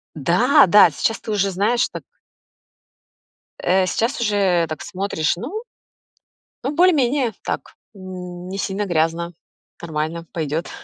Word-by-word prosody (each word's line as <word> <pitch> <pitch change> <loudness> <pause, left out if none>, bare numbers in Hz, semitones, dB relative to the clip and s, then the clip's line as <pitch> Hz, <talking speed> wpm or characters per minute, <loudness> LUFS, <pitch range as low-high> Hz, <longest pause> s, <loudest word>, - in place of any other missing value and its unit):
Да, 175 - +4
да, 205 +4 +7
сейчас 225 - -1
ты 220 - -6
уже 200 -2 +1
знаешь, 205 +6 +1
так - - -8 1.6
Э, 185 +1 +3
сейчас 230 +9 -1
уже 195 -6 +2
так 155 -1 -6
смотришь, 180 -5 -1
ну 380 - -5 1.0
ну, 270 - 0
более-менее 285 -8 +3
так, - - -4 0.2
не 185 -1 -8
сильно 200 +1 -2
грязно, 170 0 0 0.5
нормально, 160 0 -3
пойдет. 160 0 -3
190 Hz, 115 wpm, -21 LUFS, 170-225 Hz, 1.6 s, да